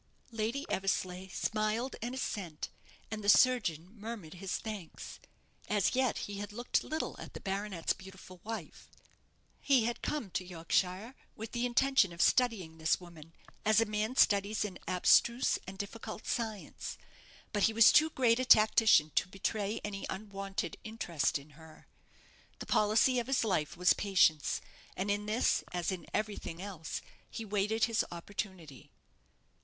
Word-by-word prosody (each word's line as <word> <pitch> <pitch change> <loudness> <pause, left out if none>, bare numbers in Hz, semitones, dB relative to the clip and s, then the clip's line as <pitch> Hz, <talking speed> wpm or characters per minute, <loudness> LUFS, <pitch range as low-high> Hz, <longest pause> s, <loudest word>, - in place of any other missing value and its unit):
Lady 230 +5 -2
Eversleigh 185 -1 -1
smiled 215 +6 -1
an 240 +3 -3
assent, 185 -11 -4 0.4
and 215 -1 -4
the 205 - +1
surgeon 205 -10 +4
murmured 215 -6 -7
his 185 +1 -3
thanks. 210 -7 -7 0.5
As 205 -3 +2
yet 260 -2 +1
he 200 -1 -6
had 205 0 -5
looked 240 +3 -1
little 315 +3 -3
at - - -10
the - - -5
baronet's 195 -3 -2
beautiful 190 -2 -13
wife. 225 +1 -7 0.7
He 265 -5 +4
had 240 0 -2
come 265 -11 -3
to 185 - -2
Yorkshire 180 +5 -1 0.2
with 220 0 -7
the 240 +1 0
intention 260 -5 +3
of 170 - -11
studying 190 -10 +2
this 160 0 +2
woman 165 -3 -13 0.3
as 215 0 +4
a 225 - +3
man 215 +3 -2
studies 205 -2 +3
an 190 -3 -7
abstruse 235 +6 +4
and 190 0 -8
difficult 215 +2 -7
science; 220 -4 -4 0.6
but 205 -2 +3
he - - -2
was 225 0 +7
too 315 +1 +5
great 245 -5 +2
a - - +1
tactician 215 -8 +6
to - - +2
betray 200 +2 -2
any 200 -1 -4
unwonted 195 -1 -4
interest 175 -12 -1
in 140 +2 -14
her. 160 +1 -16 0.7
The - - -7
policy 220 +4 +3
of 240 - -4
his 270 -2 +2
life 175 -8 -1
was 180 +1 +5
patience, 180 -7 +2 0.4
and 195 +2 0
in 205 +1 -2
this 220 +4 +2
as 175 +1 -1
in 185 -2 -6
everything 205 -5 -3
else, 185 -5 -6 0.3
he 225 - -6
waited 210 +2 0
his 230 -1 +3
opportunity. 175 - -7
205 Hz, 150 wpm, -32 LUFS, 180-225 Hz, 0.7 s, was